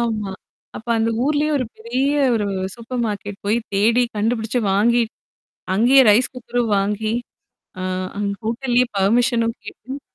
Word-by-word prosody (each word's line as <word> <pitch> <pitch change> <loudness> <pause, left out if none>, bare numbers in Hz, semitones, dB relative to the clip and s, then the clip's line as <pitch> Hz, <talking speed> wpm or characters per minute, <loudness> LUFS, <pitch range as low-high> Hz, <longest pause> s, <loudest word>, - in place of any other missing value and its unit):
ஆமா. 215 -4 -1 0.5
அப்போ 230 +2 -7
அந்த 225 +1 +1
ஊர்லயே 300 +1 +1
ஒரு 255 - 0
பெரிய 245 +4 -1 0.3
ஒரு 210 -2 0 0.3
சூப்பர் 240 +1 -4
மார்கெட் 205 -1 -5
போயி, 210 +3 +2 0.2
தேடி 225 +5 +3
கண்டுபிடிச்சு, 225 +2 0
வாங்கி, 235 +5 +3 0.7
அங்கயே 245 +7 +6
ரைஸ் 225 +5 +4
குக்கரும் 245 -2 -1
வாங்கி, 210 +2 -1 0.7
அ - - -3 0.4
அங்க 200 -1 -1
ஹோட்டல்லயே 245 +2 +1
பெர்மிஷனும் 230 +3 +2
கேட்டு 270 +3 -8
230 Hz, 130 wpm, -21 LUFS, 210-245 Hz, 0.7 s, அங்கயே